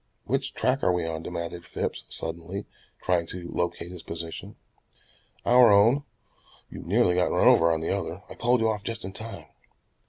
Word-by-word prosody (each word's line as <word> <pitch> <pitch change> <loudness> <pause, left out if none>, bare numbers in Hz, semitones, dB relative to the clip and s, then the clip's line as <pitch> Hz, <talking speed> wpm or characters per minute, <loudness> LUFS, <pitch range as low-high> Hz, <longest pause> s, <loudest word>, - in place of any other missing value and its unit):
"Which - - -1
track 130 +2 +1
are - - +3
we 90 -2 0
on?" 80 -1 -3
demanded 85 0 -5
Phipps - - -4
suddenly, 85 +5 -4 0.4
trying 85 -2 +1
to 90 0 -6
locate 85 0 -2
his 90 -2 -9
position. 85 0 -7 0.9
"Our 125 -2 +7
own. 115 +8 +5 0.7
You - - -7
nearly 90 - +2
got 90 0 +2
run - - +3
over 85 0 +6
on 80 -1 0
the 80 - 0
other. 95 -1 -4
I - - -9
pulled 120 +1 +2
you 110 - +3
off 105 -2 -1
just 115 -3 -3
in 95 - -5
time." 110 +3 -6
90 Hz, 180 wpm, -27 LUFS, 85-110 Hz, 0.9 s, Our